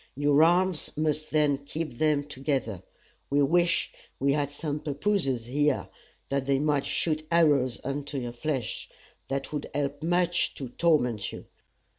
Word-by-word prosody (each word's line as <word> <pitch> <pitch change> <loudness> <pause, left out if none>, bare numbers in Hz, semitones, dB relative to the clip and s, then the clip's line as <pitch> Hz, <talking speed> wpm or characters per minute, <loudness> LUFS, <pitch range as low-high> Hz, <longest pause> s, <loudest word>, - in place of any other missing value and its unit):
Your 145 +1 +4
arms 175 +1 +3
must 155 0 0
then 150 -3 +2
keep 155 +3 -4
them 150 -2 +3
together. 135 - -2 0.5
We 145 +1 +3
wish 175 +4 +2 0.3
we 140 +1 +2
had 145 -1 0
some 145 0 -3
pappooses 145 - 0
here, 145 +3 +1 0.4
that 140 -1 -1
they 140 -1 +3
might 145 -1 +1
shoot 155 -1 -1
arrows 145 -7 +3
into 140 +1 -3
your 120 -2 -3
flesh. 130 -1 -3 0.4
That 135 +2 -3
would 150 -1 -3
help 145 0 -1
much 175 +1 +1
to 135 -3 -6
torment 125 - +1
you. - - -9
145 Hz, 145 wpm, -28 LUFS, 135-155 Hz, 0.5 s, Your